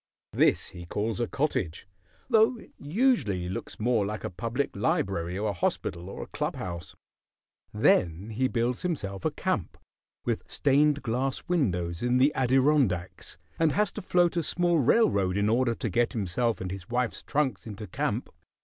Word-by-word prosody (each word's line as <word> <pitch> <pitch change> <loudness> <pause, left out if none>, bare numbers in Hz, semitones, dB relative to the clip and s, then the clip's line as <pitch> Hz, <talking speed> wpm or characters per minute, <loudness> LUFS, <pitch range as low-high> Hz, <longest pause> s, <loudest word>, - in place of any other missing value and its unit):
This - - +3
he 85 -1 -10
calls 105 +3 -2
a 120 - 0
cottage, 95 - -2 0.4
though 225 0 +4
it - - -15
usually 145 - +1
looks 90 - -5
more 115 -1 +2
like 105 +2 -4
a - - -3
public 115 +9 -2
library 95 -3 0
or 105 +1 0
a - - -1
hospital 85 0 -2
or - - -6
a - - -14
club - - -2
house. 85 -2 -6 0.8
Then 90 +6 +2
he 130 +4 +1
builds 120 0 -1
himself 100 - -3
a - - +4
camp, - - -2 0.5
with - - 0
stained 145 +1 +3
glass 130 +2 -1
windows, 90 - 0
in 125 +1 +2
the 135 +3 +4
Adirondacks, 130 - +1 0.2
and 160 -2 +3
has 210 -1 +2
to - - -6
float 175 -1 +2
a 170 - +2
small 175 +1 +2
railroad 110 - +3
in 100 0 +2
order 120 +1 +2
to 115 - -3
get 115 +4 +1
himself 115 +3 0
and 90 -1 -4
his 95 -2 -7
wife's 120 0 -1
trunks 130 -10 -1
into 105 0 -7
camp. 90 - -2
115 Hz, 165 wpm, -28 LUFS, 95-145 Hz, 0.8 s, though